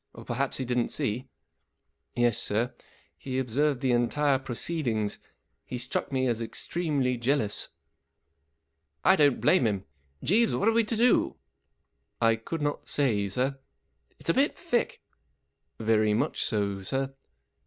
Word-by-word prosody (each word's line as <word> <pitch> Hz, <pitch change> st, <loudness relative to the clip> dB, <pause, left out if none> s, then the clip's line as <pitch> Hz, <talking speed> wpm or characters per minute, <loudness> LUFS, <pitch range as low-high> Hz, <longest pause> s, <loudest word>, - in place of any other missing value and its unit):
Or -, -, -11 dB
perhaps 135 Hz, +3 st, -1 dB
he 130 Hz, -, -2 dB
didn't 125 Hz, -1 st, +1 dB
see? 130 Hz, -2 st, -2 dB, 0.4 s
" -, -, -51 dB
44 120 Hz, -, +2 dB
Yes, 120 Hz, -3 st, +3 dB
sir, 115 Hz, +5 st, 0 dB, 0.5 s
he 130 Hz, -1 st, -4 dB
observed 130 Hz, +2 st, +1 dB
the 130 Hz, -, +2 dB
entire 135 Hz, +3 st, +2 dB
proceed¬ 135 Hz, +4 st, -2 dB
ings. 110 Hz, -3 st, 0 dB, 0.4 s
He 125 Hz, -, -5 dB
struck 125 Hz, +3 st, -2 dB
me 130 Hz, -1 st, +1 dB
as 120 Hz, -2 st, 0 dB
extremely 135 Hz, +1 st, -1 dB
jealous." 120 Hz, -3 st, +1 dB, 0.7 s
" 70 Hz, -1 st, -43 dB
I 190 Hz, -, +7 dB
don't 145 Hz, -6 st, +4 dB
blame 180 Hz, -10 st, +4 dB
him. 100 Hz, -3 st, -2 dB, 0.4 s
Jeeves, 225 Hz, +6 st, +3 dB
what 200 Hz, -, +1 dB
are -, -, +6 dB
we 230 Hz, 0 st, +3 dB
to 220 Hz, +1 st, -2 dB
do? 240 Hz, +2 st, +3 dB, 0.4 s
" -, -, -50 dB
44 115 Hz, -, +4 dB
I 115 Hz, -, +4 dB
could 150 Hz, +8 st, -5 dB
not 145 Hz, 0 st, -2 dB
say, 110 Hz, -8 st, +2 dB
sir." 125 Hz, +7 st, +1 dB, 0.6 s
44 -, -, -45 dB
It's -, -, -3 dB
a -, -, 0 dB
bit -, -, +2 dB
thick." -, -, -1 dB, 0.7 s
44 110 Hz, -, -7 dB
Very 110 Hz, -1 st, +3 dB
much 145 Hz, +7 st, 0 dB
so, 100 Hz, -5 st, -1 dB
sir." 135 Hz, +6 st, -2 dB
125 Hz, 165 wpm, -28 LUFS, 110-145 Hz, 0.7 s, I